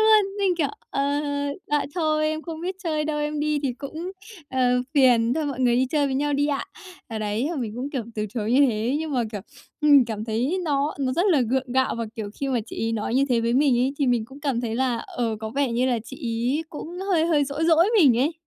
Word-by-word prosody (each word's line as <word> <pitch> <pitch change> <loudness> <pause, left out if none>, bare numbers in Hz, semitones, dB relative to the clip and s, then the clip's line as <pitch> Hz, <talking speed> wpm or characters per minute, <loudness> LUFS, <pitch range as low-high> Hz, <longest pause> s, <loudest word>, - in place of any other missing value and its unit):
luôn, 425 -2 +4
mình 390 -3 +2
kiểu: 295 -5 +1 0.2
"Ờ, 275 - 0 0.6
dạ 295 -1 +1
thôi 310 -3 +1
em 310 0 -3
không 325 -2 -7
biết 365 +2 -3
chơi 310 -4 -1
đâu, 300 -1 -2
em 295 0 -2
đi 300 0 +1
thì 265 - 0
cũng, 315 +6 -6 0.4
ờ, 260 - -1 0.3
phiền, 245 -3 +4
thôi 310 -2 -1
mọi 265 -3 -4
người 245 -2 +3
đi 260 +1 +2
chơi 295 -2 +2
với 265 - -2
nhau 290 +2 0
đi 285 +1 +2
ạ." 280 -2 -1 0.4
Ờ, 225 -2 -4
đấy, 215 +5 -1
thì 320 -6 -3
mình 225 -4 -3
cũng, 265 +4 -4
kiểu, 260 -5 -2
từ 215 -1 -2
chối 220 0 -1
như 265 - +5
thế, 230 +5 0
nhưng 315 -2 -4
mà, 250 - +1
kiểu, 205 - -4 0.4
mình 290 -3 +6
cảm 220 -2 -4
thấy 240 +11 -1
nó 290 -1 0
nó 260 -2 0
rất 350 +7 +1
là 330 -9 +4
gượng 255 +1 -1
gạo, 260 0 +2
và, 230 - -1
kiểu, 215 -2 -4
khi 275 - -3
mà 255 -2 +1
chị - - -9
ấy - - -1
nói 225 +1 -2
như 270 +2 +4
thế 240 -2 +2
với 230 +1 0
mình 265 -1 +3
ấy 255 +2 +1
thì 280 - +1
mình 240 -3 +2
cũng 270 +5 -13
cảm 275 -5 -1
thấy 230 -2 -3
là, 250 -1 +1
ờ, 230 -3 -2
có 220 - -4
vẻ 270 0 0
như 245 +2 +1
là 245 -2 +1
chị 265 - -9
ấy 240 +7 -1
cũng 310 - -7 0.2
hơi 330 -3 +3
hơi 305 -4 +3
dỗi 285 +3 -2
dỗi 330 +1 +5
mình 260 - +6
ấy. 285 +6 +2
275 Hz, 260 wpm, -24 LUFS, 240-305 Hz, 0.6 s, mình